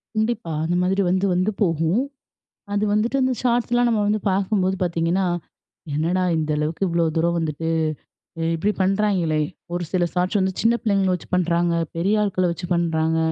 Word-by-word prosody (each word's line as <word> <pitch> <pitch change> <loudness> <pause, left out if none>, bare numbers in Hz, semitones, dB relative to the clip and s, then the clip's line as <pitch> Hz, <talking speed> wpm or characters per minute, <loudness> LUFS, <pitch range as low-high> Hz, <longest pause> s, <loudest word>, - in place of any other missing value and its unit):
கண்டிப்பா. 220 -5 -1
அந்த 175 +2 0
மாதிரி 190 +2 +1
வந்து, 185 +2 +1
வந்து 185 +4 +1
போகும். 165 +4 +2 0.7
அது 205 +1 +1
வந்துட்டு, 220 +5 +1
அந்த 260 0 +2
ஷார்ட்ஸ்லாம் 240 0 +2
நம்ம 215 -2 +1
வந்து 210 0 +1
பார்க்கும்போது 190 -1 +1
பார்த்தீங்கன்னா, 170 +2 +1 0.7
என்னடா 170 +5 +1 0.2
இந்த 155 -1 -1
அளவுக்கு 160 +5 -1
இவ்ளோ 170 0 +1
தூரம் 170 +1 +2
வந்துட்டு, 160 0 -2 0.7
இ - - -1
இப்படி 205 +6 0
பண்ணுறாய்ங்களே? 190 -5 +1 0.3
ஒரு 175 0 -2
சில 180 -2 +2
ஷாட்ஸ் 180 +3 +1
வந்து 190 0 +1
சின்ன 230 +1 +4
பிள்ளைங்கள 195 -4 +2
வச்சு 180 - -7
பண்ணுறாங்க. 175 -1 +1 0.2
பெரிய 210 +4 +2
ஆட்கள 185 -3 +1
வச்சு 175 +1 -7
பண்ணுறாங்க. 160 -1 +1
185 Hz, 160 wpm, -22 LUFS, 170-205 Hz, 0.7 s, சின்ன